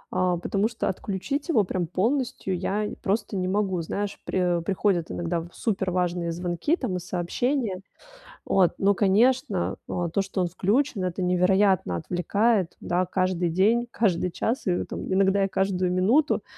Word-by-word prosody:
а, 180 -1 +2
потому 200 +4 0
что 230 -3 -2
отключить 205 - -3
его 220 -10 +4
прям 180 -2 -2
полностью 215 - -1
я 210 +3 -1
просто 205 +1 -1
не 185 0 -1
могу, 190 -3 0
знаешь, 200 +5 -4
при 180 -2 +1
приходят 190 -2 0
иногда 170 0 -2
супер 195 -4 -1
важные 175 -1 -1
звонки 175 - -1
там 225 - -3
и - - -3
сообщения, 190 +5 -1 0.7
вот, 185 -3 +3
но, 200 +1 +3
конечно, 210 +1 +2
о, 175 -2 -2
то, 200 - 0
что 195 -1 -3
он 180 - +1
включен- 205 - 0
это 180 +1 -3
невероятно 180 - +2
отвлекает, 190 - 0
да, 180 +1 0
каждый 185 -1 0
день, 215 +8 +2
каждый 185 -7 +1
час 230 +8 -2
и 180 -1 +1
там - - -6
иногда 195 +1 +3
и - - 0
каждую 190 -1 0
минуту, 235 +12 +2
190 Hz, 155 wpm, -25 LUFS, 180-210 Hz, 0.7 s, его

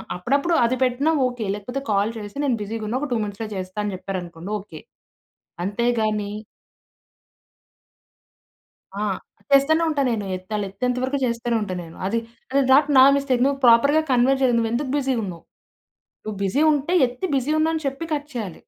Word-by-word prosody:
అప్పుడప్పుడు 280 - 0
అది 235 +2 +2
పెట్టినా 260 +5 +1
ఓకే. 245 -3 -3
లేకపోతే 245 +6 -5
"కాల్ 200 +2 +2
చేసి, 205 +1 -8
నేను 260 -4 +2
బిజీగా 220 +2 -4
ఉన్నా, 240 - -1
ఒక 295 - -2
2 240 - +1
మినిట్స్‌లో 205 +2 -5
చేస్తాను." 185 +2 -4
అని 205 - -2
చెప్పారనుకోండి 180 -1 -6
ఓకే. 165 -6 -11 0.9
అంతే 210 +4 -1 0.2
గాని 210 -1 -1 2.7
ఆ! - - -1 0.5
చేస్తానే 310 +4 +4
ఉంటా 300 -3 0
నేను. 215 -3 -2
ఎత్తాలి 185 +4 -6
ఆళ్ళేత్తెంత 210 +5 -2
వరకు 270 +2 0
చేస్తూనే 235 0 -1
ఉంటాను. 185 -4 -3
నేను 165 - -13
అది 230 +3 0 0.5
నాట్ 285 +2 +5
నా 260 - +9
మిస్టేక్, 260 -3 +1
నువ్వు 275 0 0
ప్రాపర్‌గా 280 +7 +6
కన్వే 255 +2 +4
చేయలేదు. 250 -3 +3
నువ్వెందుకు 235 +5 -1
బిజీగా 265 -4 0
ఉన్నావు. 170 -3 -8 0.8
నువ్వు 215 -2 -5
బిజీ 195 +10 +1
ఉంటే 295 +4 0
ఎత్తి 250 +8 -5
"బిజీ 270 +3 0
ఉన్నా." 320 +1 +2
అని 315 -2 -4
చెప్పి 275 +5 -4
కట్ 290 +1 -6
చేయాలి. 205 -8 -5
235 Hz, 160 wpm, -23 LUFS, 205-275 Hz, 2.7 s, నా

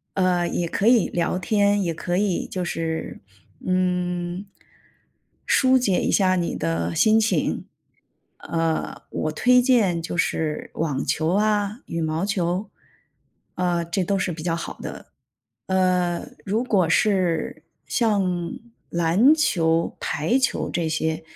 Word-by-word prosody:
呃， 180 -2 +2
也 170 - -1
可 200 +6 0
以 235 -5 +5
聊 175 +1 -1
天， 205 +1 +2
也 170 -2 -1
可 175 +2 -2
以 200 -3 0
就 185 -1 -4
是， 165 -1 -3 0.5
嗯， 180 0 -1 1.0
舒 260 0 +4
解 200 -7 +1
一 - - 0
下 185 -2 +3
你 175 -1 -1
的 85 0 -2
心 220 0 +4
情。 225 - 0 0.7
呃， 165 -1 -2
我 155 - -2
推 250 +8 +4
荐 215 -10 +2
就 170 - -5
是 155 -3 -1
网 145 -4 -1
球 160 +2 0
啊、 210 +2 +1
羽 165 - -3
毛 160 +2 -1
球， 190 0 -1 0.9
呃， 175 -1 0
这 170 +3 -2
都 195 +2 0
是 185 -1 -1
比 160 -1 -7
较 165 -2 0
好 170 - -6
的。 - - -8 0.6
呃， 180 -2 +1 0.2
如 215 +5 0
果 195 -9 +2
是 170 -4 +1 0.2
像 185 -7 0 0.4
篮 175 - +4
球 165 - +1
排 175 - 0
球 265 - 0
这 170 -2 -1
些， 160 0 -1
180 Hz, 145 characters per minute, -23 LUFS, 165-205 Hz, 1.0 s, 以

